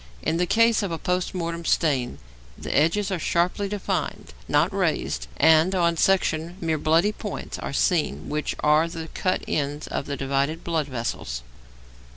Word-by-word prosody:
In 165 - 0
the 180 +1 +1
case 230 +3 +4
of 200 -4 -2
a 165 - -2
post 180 +2 -1
mortem 170 -1 -3
stain 140 -7 +1 0.4
the - - -4
edges 190 +7 +2
are 185 - -1
sharply 180 +5 0
defined, 205 - -3
not - - +2
raised, - - -1
and, 160 +5 +5
on 170 -2 +2
section, 170 -1 +1
mere 160 -3 -1
bloody 165 +7 +3
points 210 -2 -6
are - - -4
seen 160 +3 0
which 150 0 -2
are 150 +2 +4
the 165 -1 -7
cut 185 - -1
ends 145 0 -2
of - - -4
the 140 -1 -3
divided 140 +4 -1
blood 160 -4 -1
vessels. 115 - -4
165 Hz, 165 wpm, -25 LUFS, 150-180 Hz, 0.4 s, and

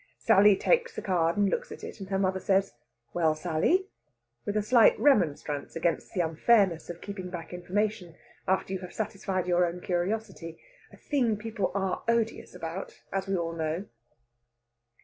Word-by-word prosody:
Sally 205 +1 +6
takes 475 - +1
the - - -5
card 170 -2 +1
and 205 -1 +3
looks 485 - -2
at - - -9
it, - - -8
and 195 -1 -8
her 195 - 0
mother 190 -1 +1
says, 195 0 +1 0.4
"Well, 160 -3 +2
Sally?" 175 - +1 0.6
with 205 +1 0
a 210 - +1
slight 230 +1 +5
remonstrance 155 - +1
against 165 +4 -1
the 180 - +2
unfairness 170 +1 +2
of 175 0 -7
keeping 195 -3 -6
back 175 -1 -7
information 180 0 -2 0.3
after 190 0 0
you 190 - -2
have 180 -1 -9
satisfied 195 -4 -2
your 180 0 +3
own 175 0 -1
curiosity 175 -2 -3 0.3
a - - -15
thing 245 -7 0
people 220 -1 -2
are 195 -2 -1
odious 230 -4 0
about, 170 +2 -7
as 195 0 -1
we 195 -1 0
all 165 -1 -2
know. 160 +3 -2
190 Hz, 170 wpm, -28 LUFS, 170-210 Hz, 0.6 s, Sally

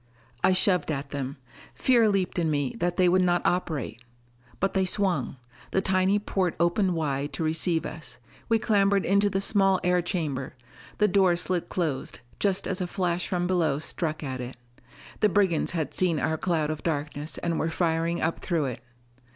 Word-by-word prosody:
I - - +5
shoved 185 -1 +2
at 140 -1 -4
them. 140 -1 -4 0.4
Fear 235 -4 +4
leaped 190 -3 0
in 165 -2 +1
me 145 -3 0
that 175 0 -1
they 185 - +4
would 185 +1 +4
not 175 -1 +1
operate. 145 -10 -1 0.6
But 195 - 0
they 190 - +2
swung. 185 -8 0 0.3
The - - +1
tiny 190 +1 +2
port 190 -4 -1
opened 175 +2 +2
wide 145 -2 -2
to 160 - -3
receive 160 +1 +1
us. 155 -6 -8 0.3
We 225 - +4
clambered 200 -3 +2
into 200 +2 +3
the 195 -1 0
small 195 -2 +3
air 180 0 +3
chamber; 155 -8 -3 0.4
the 210 - +4
door 190 -3 +4
slid 180 0 -2
closed, 160 -7 -2 0.2
just 195 -2 0
as 190 0 -2
a 180 - -1
flash 180 -1 -1
from 175 -1 -1
below 170 -6 +1
struck 155 +1 -3
at 130 -3 -4
it. 125 +1 -7 0.6
The 210 - +4
brigands 185 -4 +2
had 160 -5 -3
seen 175 -4 +2
our 160 - 0
cloud 160 -2 0
of 155 - -5
darkness 150 -1 -3
and 170 -1 -1
were 160 - 0
firing 165 0 0
up 165 +1 0
through 165 -5 -1
it. 125 -3 -5
175 Hz, 180 wpm, -26 LUFS, 155-190 Hz, 0.6 s, I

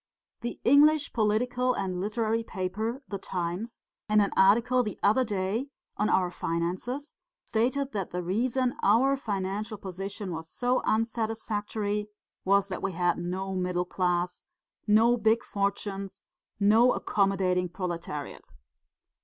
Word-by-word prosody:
The 240 0 -5
English 290 +3 +5
political 245 +3 +1
and 185 -2 -2
literary 220 +2 0
paper, 220 +7 -3
The 200 - -4
Times, 180 +6 -4 0.3
in 215 0 +5
an 200 -1 +2
article 235 +6 +4
the 215 -4 -4
other 220 +6 +4
day 210 +3 -2 0.3
on 210 - 0
our 180 -2 +2
finances 180 - -3 0.3
stated 260 +5 0
that 195 -4 -3
the 180 0 -3
reason 245 +7 0
our 250 +7 +4
financial 210 -2 -3
position 195 +1 -6
was 160 0 -6
so 250 +6 0
unsatisfactory 215 -2 -1 0.4
was 200 +1 +3
that 185 - -4
we 195 -1 -2
had 175 +1 +1
no 185 +2 -3
middle 180 -1 -1
class, 180 -1 -1 0.4
no 225 +3 +5
big 225 +1 +2
fortunes, 200 -1 -3 0.4
no 220 +5 +5
accommodating 190 -3 +1
proletariat.' 170 -5 -5
205 Hz, 125 wpm, -28 LUFS, 185-230 Hz, 0.4 s, English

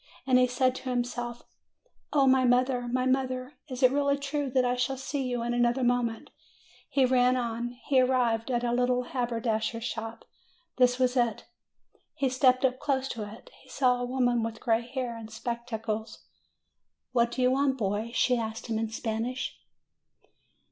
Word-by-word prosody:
And 255 -1 +4
he 250 - +4
said 255 +1 +1
to 260 - -6
himself, 240 -1 -3 0.7
"O 280 -2 +4
my 260 0 +5
mother! 250 0 +2
my 255 +1 0
mother! 260 +1 -1
Is 260 -1 -5
it 255 - +7
really 280 0 +2
true 280 0 -2
that 255 0 +2
I 245 0 +1
shall 255 +2 -1
see 270 0 -3
you 245 -2 -2
in 240 0 -1
another 240 +2 +2
moment?" 240 -2 0 0.6
He 270 -2 +3
ran 250 0 +3
on; 240 0 -3
he 265 -3 +4
arrived 245 -2 +1
at 240 -1 0
a 240 - 0
little 250 0 +2
haberdasher's 230 -3 -2
shop. 225 -1 -5 0.5
This 250 -1 +4
was 255 0 +1
it. 240 -2 0 0.7
He 275 -1 +1
stepped 255 0 +3
up 255 0 0
close 270 -2 0
to 210 -3 -5
it. 220 - -13
He - - -20
saw 250 -2 +2
a - - -1
woman 245 -2 +1
with 225 0 -4
gray 225 -1 +1
hair 250 -2 -3
and 225 -1 -9
spectacles. 225 -1 -4 0.9
"What 235 -2 +3
do 250 +2 -2
you 250 - +4
want, 270 0 +2
boy?" 210 0 -1
she 250 0 +2
asked 225 0 -4
him 225 -2 -2
in 225 -1 -2
Spanish. 225 +3 -3
245 Hz, 175 wpm, -28 LUFS, 235-255 Hz, 0.9 s, it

